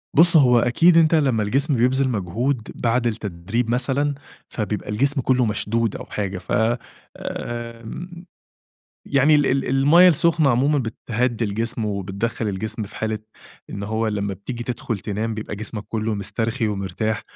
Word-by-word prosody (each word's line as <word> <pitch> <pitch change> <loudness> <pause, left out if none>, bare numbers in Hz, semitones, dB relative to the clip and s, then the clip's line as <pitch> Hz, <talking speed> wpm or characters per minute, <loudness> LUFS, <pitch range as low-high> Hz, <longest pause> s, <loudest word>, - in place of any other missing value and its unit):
بُصّ، 170 +2 +7
هو 125 -4 +5
أكيد 165 +9 +4
أنت 165 0 +5
لما 130 -8 +2
الجسم 135 +7 +1
بيبذِل 130 +3 +2
مجهود 110 +4 -2
بعد 120 +1 +1
التدريب 110 +2 -3
مثلًا، 135 +4 +1 0.3
فبيبقى 105 -2 -4
الجسم 135 +6 +1
كلُّه 125 -1 +2
مشدود 110 +1 -1
أو - - -7
حاجة، 100 -3 -4
ف 90 - -10 0.7
آآ، 115 -1 -6 1.2
يعني 140 +2 +3
ال 145 -2 +4
ال 135 +1 0
المَيَّة 145 +7 +6
السُخنة 165 -2 +3
عمومًا 140 +5 +2
بتهدّي 120 0 -2
الجسم، 115 +2 -2
وبتدخَّل 100 +2 -2
الجسم 110 +3 -3
في 100 - -8
حالة 110 -1 -2 0.5
إن 100 - -5
هو 110 +2 -1
لما 100 -2 -2
بتيجي 120 +5 -6
تدخل 120 -3 -3
تنام 110 +3 -3
بيبقى 105 -1 -6
جسمك 105 0 -5
كلُّه 110 -1 -2
مسترخي 110 +3 -2
ومرتاح، 105 +2 -2
115 Hz, 145 wpm, -22 LUFS, 105-135 Hz, 1.2 s, بُصّ